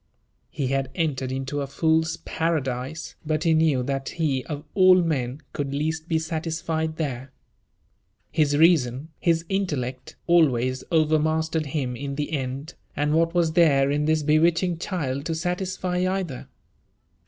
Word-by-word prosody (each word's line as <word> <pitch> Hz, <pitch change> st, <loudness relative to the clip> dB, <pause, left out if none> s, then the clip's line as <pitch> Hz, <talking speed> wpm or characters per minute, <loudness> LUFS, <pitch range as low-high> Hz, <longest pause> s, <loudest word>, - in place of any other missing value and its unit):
He 135 Hz, -3 st, -2 dB
had 135 Hz, 0 st, 0 dB
entered 135 Hz, -6 st, -1 dB
into 135 Hz, +2 st, -3 dB
a 140 Hz, -, -3 dB
fool's 160 Hz, +3 st, +1 dB
paradise, 150 Hz, -2 st, -2 dB
but 155 Hz, 0 st, -1 dB
he 165 Hz, -, +3 dB
knew 155 Hz, -5 st, +3 dB
that 135 Hz, +1 st, -2 dB
he 145 Hz, -6 st, -1 dB
of 150 Hz, -1 st, -5 dB
all 185 Hz, -1 st, +7 dB
men 150 Hz, -6 st, 0 dB
could 140 Hz, -2 st, -3 dB
least 160 Hz, +2 st, -2 dB
be 160 Hz, -, +1 dB
satisfied 160 Hz, 0 st, -2 dB
there. 135 Hz, -4 st, -4 dB, 1.0 s
His 145 Hz, -2 st, +2 dB
reason, 150 Hz, -4 st, +3 dB
his 165 Hz, -1 st, +1 dB
intellect, 140 Hz, -10 st, -3 dB
always 130 Hz, -7 st, +3 dB
overmastered 160 Hz, 0 st, +1 dB
him 135 Hz, -4 st, -2 dB
in 140 Hz, +2 st, -5 dB
the 150 Hz, +2 st, -3 dB
end; 140 Hz, +2 st, -4 dB, 0.2 s
and 150 Hz, +1 st, 0 dB
what 165 Hz, +2 st, +2 dB
was 170 Hz, -2 st, +3 dB
there 140 Hz, -5 st, +4 dB
in 150 Hz, +1 st, 0 dB
this 155 Hz, 0 st, +2 dB
bewitching 165 Hz, +3 st, +2 dB
child 140 Hz, -8 st, -3 dB
to 165 Hz, -, -1 dB
satisfy 180 Hz, +1 st, -2 dB
either? 185 Hz, -9 st, -3 dB
155 Hz, 140 wpm, -24 LUFS, 135-165 Hz, 1.0 s, all